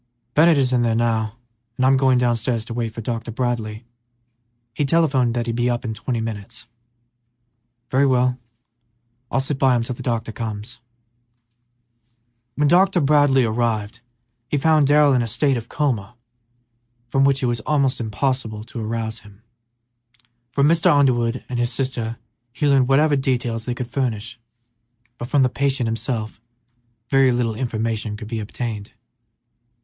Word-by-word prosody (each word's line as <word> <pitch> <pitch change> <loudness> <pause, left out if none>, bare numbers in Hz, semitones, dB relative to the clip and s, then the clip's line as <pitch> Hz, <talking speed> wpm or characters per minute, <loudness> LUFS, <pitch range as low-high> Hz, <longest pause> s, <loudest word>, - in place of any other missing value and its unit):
"Bennett 160 +1 +5
is 130 -2 +2
in 125 - +3
there 115 -1 +1
now, 115 -1 0 0.4
and 130 - +2
I'm 135 +1 +5
going 130 -1 +3
downstairs 120 -1 0
to 115 - -6
wait 115 -1 -2
for 115 - -7
Dr. 115 0 -4
Bradley; 115 -2 -3 0.9
he 145 - -1
telephoned 135 -5 +2
that 120 -1 -1
he'd 115 -1 -2
be 120 +1 +1
up 120 0 -2
in 110 - -2
twenty 115 +3 -3
minutes." 110 0 -6 1.3
"Very 135 +2 +3
well; 125 -1 +2 0.9
I'll - - 0
sit 135 +1 -2
by 130 -2 +4
him 120 - +1
till 125 - -4
the - - -9
doctor 115 -2 -2
comes." 110 -1 -6 1.8
When 150 0 +2
Dr. 180 +3 +4
Bradley 145 -3 +4
arrived 110 -1 -1 0.5
he 145 - 0
found 155 0 +3
Darrell 145 -1 +5
in 125 - +3
a 115 - -2
state 135 +5 +1
of 115 -1 -6
coma 120 -7 -2 0.9
from 135 +2 +2
which 135 -1 +2
it - - +3
was 120 -1 0
almost 140 +1 0
impossible 110 -1 -2
to 115 0 -7
arouse 110 0 -3
him. 105 +1 -18 1.1
From 140 +3 +3
Mr. 165 +1 +3
Underwood 130 -4 +2
and 125 -1 -3
his 120 +1 0
sister 120 -3 -2 0.3
he 125 +4 -2
learned 135 -3 +4
whatever 145 +3 +4
details 125 -4 -1
they 125 - -2
could 125 - -4
furnish, 115 -2 -3 0.8
but 120 - -5
from 140 +1 +3
the - - +4
patient 135 0 0
himself 115 -1 -3 0.7
very 135 -1 +5
little 120 -2 0
information 110 -2 -3
could 110 -1 -8
be 115 -1 -3
obtained. 105 -1 -5
120 Hz, 155 wpm, -21 LUFS, 115-135 Hz, 1.8 s, Bennett